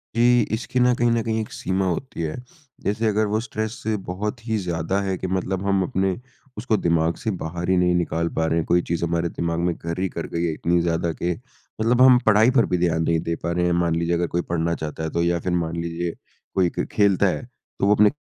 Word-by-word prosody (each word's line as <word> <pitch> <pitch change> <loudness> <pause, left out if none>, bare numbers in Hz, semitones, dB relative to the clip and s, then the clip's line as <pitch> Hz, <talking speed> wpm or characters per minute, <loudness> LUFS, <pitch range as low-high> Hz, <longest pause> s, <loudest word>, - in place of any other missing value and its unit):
जी। 120 +1 +5
इसकी 125 +2 -2
ना 125 0 +5
कहीं 120 0 +2
न 115 0 +2
कहीं 110 0 -1
एक 110 - -7
सीमा 95 +1 -1
होती 90 +2 -3
है। 80 -2 -2 0.5
जैसे 110 +3 0
अगर 110 0 +2
वो 105 +1 0
स्ट्रेस 110 -1 -3
से 110 0 0
बहुत 105 +6 -4
ही 110 -1 +1
ज़्यादा 90 0 -1
है 95 -2 -1
कि 95 - -4
मतलब 95 +1 -2
हम 100 -1 +2
अपने 95 +1 0 0.4
उसको 110 0 +1
दिमाग 85 -2 +1
से 110 - -2
बाहर 85 +2 -4
ही 95 - +4
नहीं 90 0 +3
निकाल 85 -1 0
पा 80 - +1
रहे 80 +1 +1
हैं। 80 - 0
कोई 85 0 +3
चीज़ 85 0 -1
हमारे 85 0 0
दिमाग 85 0 -2
में 85 0 +1
घर 85 +1 -5
ही 95 0 0
कर 85 - -5
गई 85 - 0
है 85 - +1
इतनी 85 +2 +1
ज़्यादा 85 0 0
कि 85 +3 -2 0.5
मतलब 120 +3 +3
हम 130 -1 +8
पढ़ाई 110 +3 +5
पर 115 - +5
भी - - +4
ध्यान 85 -2 +1
नहीं 80 0 +2
दे 85 +1 -2
पा 85 - -1
रहे 90 0 +1
हैं। 90 - +2
मान 85 -1 +1
लीजिए 85 +1 0
अगर 85 0 0
कोई 85 - +2
पढ़ना 85 0 0
चाहता 80 0 -5
है 80 - -1
तो 85 - 0
या 85 0 +1
फिर 90 - -3
मान 85 -1 -1
लीजिए 85 0 -3 0.4
कोई 95 -2 +3
क - - +1
खेलता 100 -3 +3
है, - - -1 0.4
तो - - +2
वो 105 +1 +5
अपने 105 0 +6
90 Hz, 250 wpm, -23 LUFS, 85-105 Hz, 0.5 s, हम